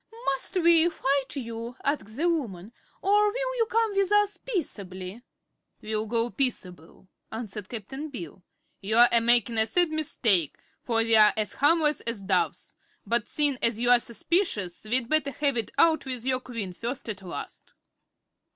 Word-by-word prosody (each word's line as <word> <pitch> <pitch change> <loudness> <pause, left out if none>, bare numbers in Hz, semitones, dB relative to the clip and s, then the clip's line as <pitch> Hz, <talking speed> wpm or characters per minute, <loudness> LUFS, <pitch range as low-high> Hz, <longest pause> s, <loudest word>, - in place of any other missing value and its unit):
"Must 270 +7 -2
we 340 0 +5
fight 275 -4 -1
you?" 230 -2 -6
asked 270 -6 -2
the 335 +4 +1
woman, 230 - -3 0.3
"or 410 +2 +4
will - - -3
you 455 -2 +1
come 455 -1 +1
with 395 0 +1
us 415 0 +3
peaceably?" 200 - -5 0.6
"We'll 215 0 -3
go 230 +1 -1
peaceable," 185 -10 -4 0.2
answered 210 -3 -6
Cap'n 265 +7 -6
Bill. 180 - -8 0.4
"You're 220 +5 +5
a 235 - +4
makin' 235 -1 +3
a 220 - +4
sad 350 +3 +3
mistake, 225 - +1 0.2
for 235 - -3
we're 220 -2 +6
as 215 -1 -2
harmless 300 0 +2
as 230 -3 -2
doves; 190 -2 -1 0.3
but 235 -1 0
seein' 290 -4 +1
as 230 -1 0
you're 245 0 +5
suspicious 235 - -2
we'd 240 +2 +1
better 310 0 +2
have 280 -1 -1
it 230 -2 -2
out 320 -4 +3
with 250 -2 -4
your 260 -1 +1
Queen 230 -7 -6
first 240 +8 -5
as 205 -3 -5
last." 180 -2 -9
240 Hz, 155 wpm, -26 LUFS, 215-305 Hz, 0.6 s, we're